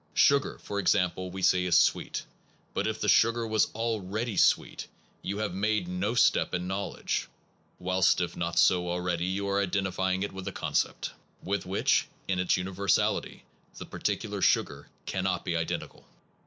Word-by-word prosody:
Sugar, 140 -1 +3
for 100 - -5
example, 90 -1 +1
we 95 +1 -6
say 90 0 +4
is 90 -2 +3
sweet. - - +1 0.5
But - - -1
if - - -2
the - - -2
sugar 115 0 +4
was 110 -1 +2
already 110 0 -2
sweet, - - +2 0.3
you 100 +2 -4
have 105 -3 -2
made 100 -1 0
no 95 +6 -2
step 120 - +3
in 90 0 -2
knowledge; 95 +1 -3 0.5
whilst 95 0 +2
if 90 -1 -2
not 85 0 -3
so 90 -1 +4
already, 90 -1 -1
you 100 +2 -2
are 100 0 +1
identifying 95 -1 -1
it 100 - -3
with 95 -1 -7
a - - -2
concept, - - -1 0.3
with 100 0 -2
which, 95 +2 +2 0.2
in 95 -1 0
its 90 0 +2
universality, 95 +2 0 0.3
the - - -7
particular - - -3
sugar - - +1 0.2
cannot 95 -2 -2
be 85 - -1
identical. 80 -1 -4
95 Hz, 160 wpm, -28 LUFS, 90-100 Hz, 0.5 s, say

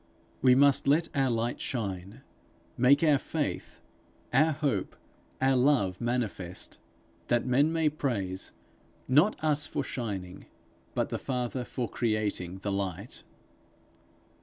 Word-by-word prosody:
We 125 -1 +6
must 140 0 +5
let 155 +4 +3
our 135 -2 +2
light 115 0 -1
shine, 100 -5 -4 0.5
make 135 +5 +4
our 150 -4 +4
faith, 150 0 -4 0.5
our 155 +5 +5
hope, 140 -10 -1 0.4
our 135 0 +3
love, 125 -8 +2
manifest 115 -7 -3 0.5
that 120 0 +1
men 140 +5 +3
may 165 -1 +1
praise, 110 -11 -2 0.6
not 150 +11 +4
us 150 -1 +1
for - - -2
shining, 100 -7 -5 0.5
but - - 0
the - - -3
Father 125 -1 -2
for 120 0 -4
creating 105 -6 -2
the 100 - -1
light. 100 +2 -4
125 Hz, 120 wpm, -29 LUFS, 100-140 Hz, 0.6 s, We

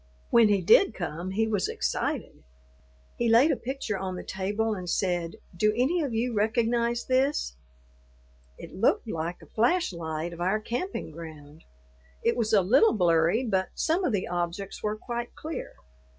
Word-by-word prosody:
When 230 -2 +6
he 200 -2 +3
did 230 - +5
come, 175 0 -4
he 215 +4 +1
was 210 -3 0
excited; - - -2 0.8
he 235 - +1
laid 245 +8 +6
a - - +2
picture 240 -6 -4
on 185 -1 -3
the - - -6
table 205 +4 -1
and 180 -3 -5
said, 175 -3 -1 0.2
"Do 215 +5 +3
any 305 +8 +2
of 285 -4 -2
you 230 +2 -1
recognize 235 +2 +1
this?" 260 - +1 1.0
It - - -10
looked - - +1
like 165 +2 -4
a - - -19
flash 245 - +2
light 160 0 -4
of 170 - -9
our 190 +5 +1
camping 245 - -4
ground. 155 -1 -11 0.6
It - - +2
was 225 -3 0
a 200 -3 +5
little 260 - +5
blurry, 175 +5 +3
but 190 -4 0
some 340 +4 +1
of 310 - +1
the 200 -4 -1
objects 175 +3 -3
were 210 0 -2
quite 240 +1 -5
clear. 315 +1 -6
210 Hz, 165 wpm, -27 LUFS, 175-240 Hz, 1.0 s, When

